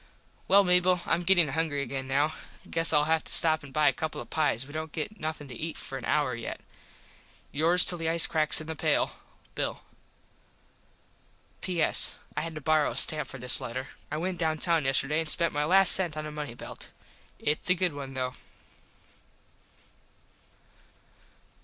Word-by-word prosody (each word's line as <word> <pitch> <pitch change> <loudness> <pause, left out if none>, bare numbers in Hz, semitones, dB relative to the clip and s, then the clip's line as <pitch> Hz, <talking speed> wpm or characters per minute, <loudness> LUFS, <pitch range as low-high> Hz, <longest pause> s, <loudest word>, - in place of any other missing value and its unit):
Well 200 +1 +5
Mable 180 0 +2
Im 165 - 0
gettin 175 -3 +3
hungry 145 -1 -2
again 135 0 -6
now. 145 +4 0 0.3
Guess 165 0 0
Ill 150 -2 +3
have 160 +1 0
to - - -5
stop 160 -1 +4
an 140 - -13
buy 150 +1 +1
a - - +3
couple 160 -1 -5
of - - -11
pies. 145 -6 -1
We 145 - -14
dont 160 0 -6
get 180 +9 -6
nothin 155 -2 -6
to 125 - -9
eat 160 +6 -6
for 135 - -8
an 135 - -7
hour 145 -4 0
yet. 115 -1 -7 0.9
yours 165 +5 +5
till 175 - 0
the 165 0 -2
ice 165 0 +7
cracks 155 -1 +2
in 155 - -8
the 160 0 -6
pale, - - -1 0.4
Bill. - - -5 1.8
P.S. 175 -4 +1 0.2
I - - -2
had 165 0 -7
to 155 - -7
borrow 155 +1 +1
a - - -7
stamp 155 -1 +2
for - - -8
this 125 0 0
letter. 130 +3 -6 0.2
I 150 - -4
went 180 +2 -4
down 160 -2 -1
town 165 -2 0
yesterday 135 +3 0
an 165 - -3
spent 170 +2 0
my 150 0 -1
last 190 +4 +7
sent 175 -5 +8
on 155 - -5
a 150 - -7
money 150 -5 -7
belt. - - -10 0.5
Its 150 +4 -2
a 180 - +4
good 180 -2 -1
one 135 -2 -9
though. 130 -1 -4
155 Hz, 185 wpm, -27 LUFS, 145-165 Hz, 1.8 s, sent